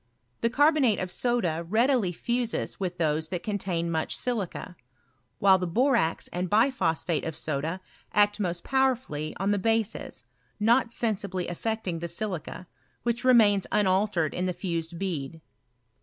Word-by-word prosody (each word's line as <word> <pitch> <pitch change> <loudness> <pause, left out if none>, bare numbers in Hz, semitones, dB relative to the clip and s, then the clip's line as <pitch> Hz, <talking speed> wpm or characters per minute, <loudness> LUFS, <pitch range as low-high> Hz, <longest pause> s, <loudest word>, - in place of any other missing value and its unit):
The 230 - +1
carbonate 285 - +3
of 185 -1 -3
soda 185 -10 0
readily 230 -2 +2
fuses 240 +5 -2
with 180 -2 -3
those 160 -1 0
that 180 -1 -4
contain 180 -5 -2
much 160 -1 -1
silica, 210 -7 -3 0.6
while 190 -1 +5
the 180 - -2
borax 235 - +1
and 180 +1 -3
btphosphate 205 - +1
of 160 -1 -5
soda 155 +3 -2 0.3
act 205 0 +3
most 175 -3 -2
powerfully 255 - 0
on 195 +2 0
the 205 - +1
bases, 225 +1 -1 0.4
not 230 +3 +3
sensibly 200 -6 -1
aifecting 190 -1 -3
the 170 - -4
siUca, 180 0 -2 0.4
which 235 +1 -1
remains 215 -6 +5
unaltered 190 -5 +2
in 180 +1 -1
the 180 - -1
fused 170 -2 -4
bead. 165 -5 -4
195 Hz, 140 wpm, -27 LUFS, 170-230 Hz, 0.6 s, while